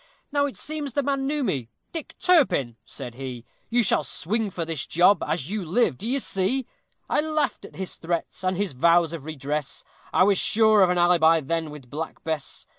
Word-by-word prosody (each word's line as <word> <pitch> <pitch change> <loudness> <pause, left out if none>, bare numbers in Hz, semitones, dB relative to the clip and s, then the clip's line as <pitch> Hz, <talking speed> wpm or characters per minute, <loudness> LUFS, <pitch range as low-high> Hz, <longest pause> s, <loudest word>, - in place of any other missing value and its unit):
Now 285 0 +2
it 275 - -8
seems 300 -4 -3
the 285 - +1
man 275 0 0
knew 295 0 0
me; 135 - -2 0.2
"Dick 325 -4 -6
Turpin," 265 - +3
said 120 +1 -8
he, 125 -2 -7 0.2
"You 240 +1 +3
shall 195 - +2
swing 215 +4 -1
for 175 -3 -4
this 160 -4 -3
job, 175 +2 +4
as 165 +1 -2
you 210 -2 -2
live, 175 - +1
d'ye 240 +7 0
see;" 240 +2 0 0.4
I - - +2
laughed 305 -3 -1
at - - -13
his 190 -1 -5
threats 170 +2 -3
and 185 -1 0
his 200 -5 -1
vows 170 +4 +3
of 155 -4 -6
redress; 150 -1 -3 0.3
I - - +4
was 195 -1 +3
sure 220 -1 +5
of 185 - +5
an 180 - +1
alibi 170 -2 +5
then 160 +2 -2
with 140 -5 -11
Black 160 +2 -6
Bess. 160 -3 -4
180 Hz, 195 wpm, -25 LUFS, 155-240 Hz, 0.4 s, sure